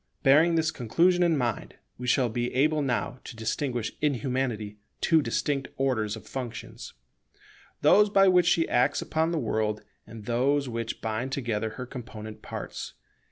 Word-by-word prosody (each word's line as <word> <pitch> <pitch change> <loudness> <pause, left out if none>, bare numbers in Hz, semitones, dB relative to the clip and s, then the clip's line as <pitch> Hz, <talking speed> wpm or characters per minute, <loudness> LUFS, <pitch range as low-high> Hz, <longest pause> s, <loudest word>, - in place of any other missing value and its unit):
Bearing 155 +5 +5
this 160 -1 +2
conclusion 170 +10 +2
in 170 -3 +3
mind, 120 -5 -2 0.2
we 125 - -5
shall 125 0 +3
be 120 +2 -2
able 150 +3 +3
now 125 -1 -1
to - - -9
distinguish 115 +1 -2
in 150 -2 +2
Humanity 115 -4 -3 0.2
two 160 -1 +4
distinct 135 +2 -1
orders 115 -6 0
of 110 -1 -11
functions: 120 0 -7 0.9
those 210 +1 +6
by 195 -1 +5
which 180 -2 +5
she 170 -2 +3
acts 130 +4 +2
upon 160 +1 0
the 170 - -1
world, 110 -4 -1 0.2
and 110 -2 -10
those 135 +4 +1
which 115 -1 -4
bind 110 +4 -2
together 110 -5 -2
her 125 - -4
component 110 -3 -9
parts. - - -7
125 Hz, 160 wpm, -27 LUFS, 115-150 Hz, 0.9 s, those